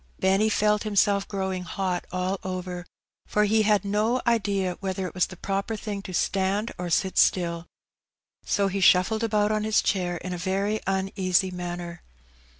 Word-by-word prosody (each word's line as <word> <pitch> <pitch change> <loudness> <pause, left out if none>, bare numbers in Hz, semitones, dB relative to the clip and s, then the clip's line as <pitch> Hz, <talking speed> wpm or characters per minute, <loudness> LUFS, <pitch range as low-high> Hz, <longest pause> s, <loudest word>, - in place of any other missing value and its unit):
Benny 195 +3 +3
felt 210 0 +2
himself 205 -1 +2
growing 190 -2 -2
hot 180 0 -3
all 185 +1 -1
over, 180 -1 -5 0.4
for 210 - +2
he 220 +1 +3
had 210 -2 +2
no 215 +5 +1
idea 200 -6 +1
whether 190 -1 -3
it - - -6
was 185 - +1
the 185 - -11
proper 195 +4 -2
thing 205 -1 -5
to 195 - -8
stand 195 +4 0
or 180 -1 -3
sit 190 +3 0
stiU, 170 -2 +2 0.8
so 200 -1 +1
he 195 0 -2
shuffled 190 +5 +4
about 210 -1 +2
on 215 0 0
his 215 0 +3
chair 180 -3 0
in 185 +2 -5
a 175 - -5
very 195 +4 0
uneasy 190 -1 +1
manner. 175 -1 -6
195 Hz, 165 wpm, -26 LUFS, 185-210 Hz, 0.8 s, shuffled